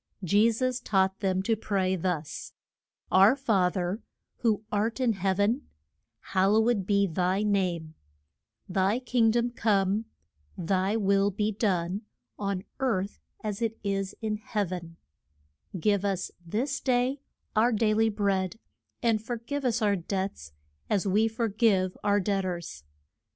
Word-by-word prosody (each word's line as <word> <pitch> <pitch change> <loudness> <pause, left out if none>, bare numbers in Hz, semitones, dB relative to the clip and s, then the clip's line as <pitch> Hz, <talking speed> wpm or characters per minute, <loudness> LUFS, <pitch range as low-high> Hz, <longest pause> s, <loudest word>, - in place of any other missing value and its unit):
Je 205 +6 +4
sus 255 +2 -1
taught 190 -4 +1
them 190 -2 0
to 225 +3 +2
pray 190 -3 0
thus: 170 -4 -3 0.6
Our 195 +6 +7
Fa 215 -10 +2
ther, 185 +3 -2 0.4
who 220 -3 +1
art 215 +4 0
in 245 -3 +2
heav 195 0 -1
en, 225 +7 +1 0.7
Hal 190 +1 +4
low 220 +2 +4
ed 200 -6 0
be 200 -1 +3
thy 185 +3 0
name, 180 -6 0 0.7
Thy 190 +4 +1
king 245 -2 +2
dom 240 +2 +1
come, 205 -2 +1 0.5
Thy 190 +4 +1
will 200 -1 +3
be 210 +2 -1
done 195 -2 0 0.4
on 200 -2 -2 0.2
earth 210 -7 -1 0.2
as 210 0 -3
it 225 -1 -1
is 195 -1 -2
in 215 -1 -1
heav 210 -3 -2
en, 170 -2 -6 0.8
Give 200 +3 +2
us 195 -2 -1
this 240 - -2
day 255 +2 +1 0.3
our 230 +3 +4
dai 215 -1 +2
ly 225 +1 +3
bread, 200 -1 0 0.5
and 225 -2 +2
for 240 +1 -3
give 280 +5 -4
us 240 -2 +1
our 205 -1 +3
debts 190 - -4 0.4
as 200 -2 +1
we 210 +3 +3
for 225 +1 -1
give 200 -4 +2
our 205 0 +3
debt 195 0 0
ors. 170 - -5
205 Hz, 150 wpm, -28 LUFS, 190-225 Hz, 0.8 s, Our